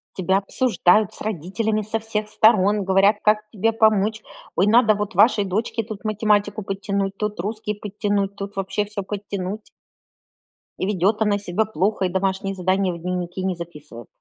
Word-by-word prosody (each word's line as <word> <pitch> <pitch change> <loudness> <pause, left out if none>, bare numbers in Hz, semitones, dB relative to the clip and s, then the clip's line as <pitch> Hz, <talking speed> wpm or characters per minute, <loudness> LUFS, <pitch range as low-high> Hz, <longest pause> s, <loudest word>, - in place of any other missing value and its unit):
Тебя 190 +1 +1
обсуждают 210 -2 +2
с - - -9
родителями 215 +3 -2
со 215 +2 -2
всех 215 -1 -3
сторон, 210 -2 +3
говорят, 195 +2 +4
как 210 0 +4
тебе 225 +1 0
помочь. 215 -1 +2 0.3
Ой, 185 - +3
надо 220 0 +5
вот 205 -1 -3
вашей 205 +2 +4
дочке 215 +4 -2
тут 215 -1 -9
математику 210 -1 +1
подтянуть, 195 0 -2
тут 210 0 -3
русский 210 +1 -3
подтянуть, 205 -1 -2
тут 200 0 -6
вообще 195 +2 -1
всё 205 -1 -5
подтянуть. 200 0 -5 1.1
И - - -1
ведет 205 +2 +1
она 210 -2 +2
себя 200 +1 -1
плохо 205 0 -1
и 180 - 0
домашние 190 +1 -1
задания 185 0 0
в 170 - -8
дневники 180 +1 -4
не 190 -1 -1
записывала. 150 -9 -10
205 Hz, 160 wpm, -22 LUFS, 190-215 Hz, 1.1 s, надо